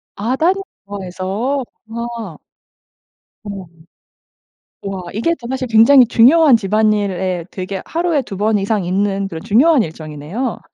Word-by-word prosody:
아 230 +6 -1
딸이 330 +7 +3 0.3
좋아해서. 200 +7 -3 0.2
와. 230 -7 -6 1.1
어. 195 -4 -7 1.2
와 195 -1 -4
이게 230 +11 0
좀 235 0 -8
사실 260 -1 -2
굉장히 235 +4 +6
중요한 270 +4 +6
집안일에 200 -4 0
되게 190 0 -5
하루에 335 -3 0
2 195 -6 -8
번 215 +1 +1
이상 200 0 -1
있는 195 +2 0
그런 165 -4 -7
중요한 255 +7 +4
일정이네요. 160 - -5
215 Hz, 250 characters per minute, -17 LUFS, 190-245 Hz, 1.2 s, 굉장히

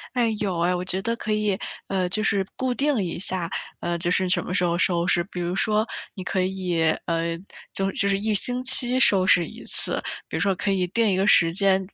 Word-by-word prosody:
哎， 230 -3 +1
有 190 -5 -2
哎。 175 +2 +1
我 180 - -3
觉 185 +1 -1
得 230 +4 -2
可 220 -2 -5
以， 210 -2 0 0.3
呃， 185 -2 -1
就 215 +4 -1
是 200 -3 0
固 255 -1 -1
定 275 -3 0
一 175 -3 -4
下， 180 -2 -2 0.3
呃， 175 0 -3
就 175 +1 -1
是 185 +1 +1
什 180 -1 +1
么 - - -5
时 180 - +1
候 170 0 0
收 175 -1 +1
拾。 175 - +2
比 180 0 -9
如 175 +1 -3
说 215 +2 0 0.3
你 190 - -6
可 185 0 -1
以， 185 -2 -2 0.2
呃， 165 0 -2 0.4
就 195 0 -1
就 200 - +1
是 195 - +1
1 215 +1 -1
星 245 +5 +4
期 255 -1 +6
收 195 -7 +5
拾 175 -2 +4
1 - - -11
次， - - 0 0.2
比 - - -7
如 - - -2
说 195 +1 +2
可 195 +2 -3
以 190 -2 +1
定 225 +4 0
一 - - +1
个 190 +2 0
时 165 -5 +4
间。 195 0 +2
190 Hz, 245 characters per minute, -23 LUFS, 180-215 Hz, 0.4 s, 期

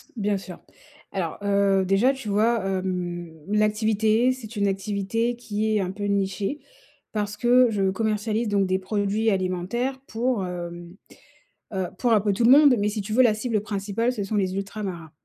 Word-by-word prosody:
Bien 205 -2 0
sûr. 185 -2 -9 0.5
Alors, 175 -4 -3
heu, 200 -1 +2
déjà, 200 +8 +3
tu 265 -6 -7
vois, 220 0 +2
hem, 180 -3 -3 0.2
l'activité, 215 +3 +2
c'est 230 -3 -7
une 200 -1 +1
activité 200 +4 -1
qui 215 -2 -2
est 210 - +2
un 185 -1 -2
peu 205 +1 -7
nichée, 200 +6 -1 0.5
parce 210 -1 -3
que 245 +2 +5
je 195 -3 +1
commercialise 220 +2 -1
donc 200 -2 +2
des 185 0 +1
produits 205 +3 0
alimentaires 195 +8 -1
pour, 230 -3 -1
hem, 175 0 -7 0.8
heu, 190 -2 -1
pour 240 +1 +2
un 210 - +4
peu 205 -1 +1
tout 230 - 0
le 240 - +6
monde. 285 -2 +7
Mais, 205 - +1
si 210 0 -3
tu 215 +2 -5
veux, 255 +3 +5
la 230 - +4
cible 220 -1 -1
principale 210 +3 -2
ce 210 -5 -3
sont 210 +2 -3
les 190 -2 0
ultramarins 195 -5 -5
205 Hz, 175 wpm, -24 LUFS, 195-225 Hz, 0.8 s, monde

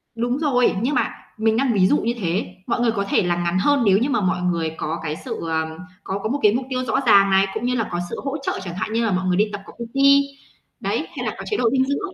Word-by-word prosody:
Đúng 240 +3 -1
rồi. 250 -8 +2
Nhưng 265 +3 0
mà - - +1 0.3
mình 220 0 +2
đang 260 -2 +2
ví 185 -2 +4
dụ - - +3
như 235 +1 -1
thế, 180 0 -1 0.2
mọi 240 - 0
người 235 -2 +3
có 200 -2 -2
thể - - +3
là 175 -1 +1
ngắn 175 +1 0
hơn 285 +3 +3
nếu 195 -1 +5
như 255 +6 0
mà 235 -5 +1
mọi 180 -1 0
người 170 -3 0
có 160 +2 -3
cái 155 -1 -3
sự, - - -4
ờ, 160 0 -2 0.3
có 195 +1 -3
có 215 - -1
một 285 +3 -1
cái 210 0 +5
mục 250 +1 -1
tiêu 255 0 -1
rõ - - +1
ràng 200 -3 +6
này, 195 0 +4
cũng 240 - -3
như 250 0 +1
là 225 -3 -1
có 175 - -2
sự - - -5
hỗ 280 +1 -2
trợ, 275 - -3
chẳng 175 -2 -6
hạn 215 +3 -3
như 230 0 +1
là 215 - +1
mọi 185 0 0
người 180 0 +1
đi 210 - +4
tập 200 - -5
có - - -12
PT, 235 +2 -8 0.8
đấy, - - -2
hay - - -3
là - - -7
có - - -7
chế 420 - -2
độ 235 -2 +2
dinh 265 -1 +2
dưỡng. 365 +8 -3
220 Hz, 295 wpm, -22 LUFS, 185-250 Hz, 0.8 s, ràng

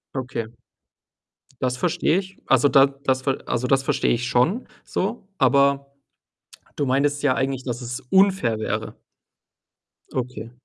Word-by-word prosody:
Okay. 130 -3 -3 1.1
Das 125 -1 0
verstehe 170 +2 +1
ich. 190 0 -5
Also, 135 +2 +4
da 135 0 +6
das 135 -1 -2
ver 135 0 0
also, 125 +1 -1
das 135 0 +3
verstehe - - +1
ich 120 +1 0
schon 150 - +1 0.2
so, 205 +1 -3
aber 140 +1 +3 0.8
du 145 - -1
meintest 145 +2 +1
ja 140 - +4
eigentlich, 135 -1 -2
dass 120 -1 -4
es 125 +2 -5
unfair 190 - +3
wäre. 110 - -3 1.2
Okay. 120 -3 -4
135 Hz, 135 wpm, -23 LUFS, 125-145 Hz, 1.2 s, da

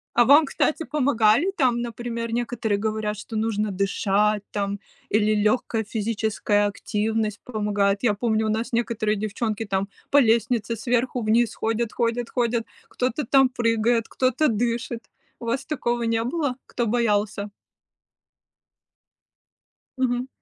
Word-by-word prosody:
А 240 - +6
вам, 290 +4 +7
кстати, 310 +3 0
помогали 275 - +2
там? 245 -4 +2
Например, 235 0 -4
некоторые 230 -3 -1
говорят, 215 0 -2
что 220 +1 -6
нужно 215 -1 0
дышать 200 +2 +1
там 200 -1 -2 0.3
или 215 0 +2
легкая 215 +1 +1
физическая 215 -1 0
активность 215 +1 -2
помогает. 205 -2 0
Я 215 -4 +3
помню, 220 0 0
у - - 0
нас 225 +2 -2
некоторые 230 -2 0
девчонки 215 +1 -2
там 195 0 -1 0.2
по 285 - +4
лестнице 230 -2 +2
сверху 245 +1 0
вниз 225 +2 +2
ходят 225 0 -1
ходят 235 0 -1
ходят, 235 -1 0 0.2
кто-то 255 +3 -2
там 270 -1 +5
прыгает, 230 -1 +1
кто-то 260 +3 +1
дышит. 230 +1 -2 0.4
У 235 - -8
вас 235 +3 -1
такого 240 -6 -1
не 230 0 +1
было, 275 0 -1
кто 240 - -2
боялся? 210 -3 0 2.5
Мгм. 250 0 0
230 Hz, 130 wpm, -24 LUFS, 210-240 Hz, 2.5 s, вам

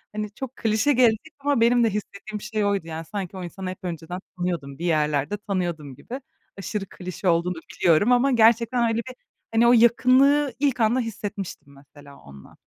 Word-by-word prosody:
Hani, 210 -1 -3
çok 265 +2 -7
klişe 225 +6 +1
gelecek 245 +4 +2
ama 280 -3 +1
benim 240 +1 +4
de 225 - +3
hissettiğim 210 0 -6
şey 215 -1 -2
oydu 200 -5 -1
yani. 160 0 -6
Sanki 190 +1 -6
o 185 - -6
insanı 185 +2 -6
hep 185 - -9
önceden 175 0 -5 0.2
tanıyordum, 170 -6 -3
bir 170 - -4
yerlerde 150 +2 0
tanıyordum 175 -9 -4
gibi. 255 - -8 0.4
Aşırı 195 +1 -4
klişe 185 0 -6
olduğunu 170 +2 +1 0.2
biliyorum 175 +7 +4
ama 250 +3 +4
gerçekten 235 +1 +4
öyle 225 - 0
bir, 255 - -8 0.4
hani, 230 +1 +4
o 245 - +6
yakınlığı 255 +4 +4
ilk 280 -4 +1
anda 230 +3 +3
hissetmiştim 205 - -6
mesela 140 0 -16
onunla. 70 0 -15
205 Hz, 175 wpm, -24 LUFS, 175-235 Hz, 0.4 s, o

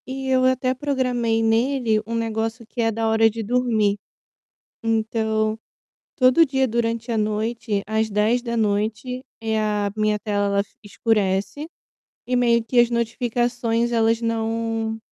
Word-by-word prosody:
E 265 0 -5
eu 255 0 +3
até 255 0 +2
programei 250 -5 0
nele 225 0 +2
um 230 - -3
negócio 225 +1 -2
que 240 +2 -4
é 225 0 +2
da 225 +1 -1
hora 225 0 +4
de 225 +1 -5
dormir. 220 -3 +1 0.8
Então, 220 -1 0 0.6
todo 255 +5 +5
dia 265 -2 +1
durante 230 0 -2
a - - 0
noite, 215 0 -1
às 220 +1 0
22h, 225 +2 0 0.2
eh, 220 -1 -1
a 210 -1 -1
minha 215 -1 +1
tela 205 -1 0 0.2
escurece 210 +5 -1 0.6
e 250 - 0
meio 235 -2 +3
que 245 +2 +1
as 240 -1 +5
notificações 235 0 0
elas 225 0 +2
não 225 -1 -2
225 Hz, 130 wpm, -22 LUFS, 220-240 Hz, 0.8 s, todo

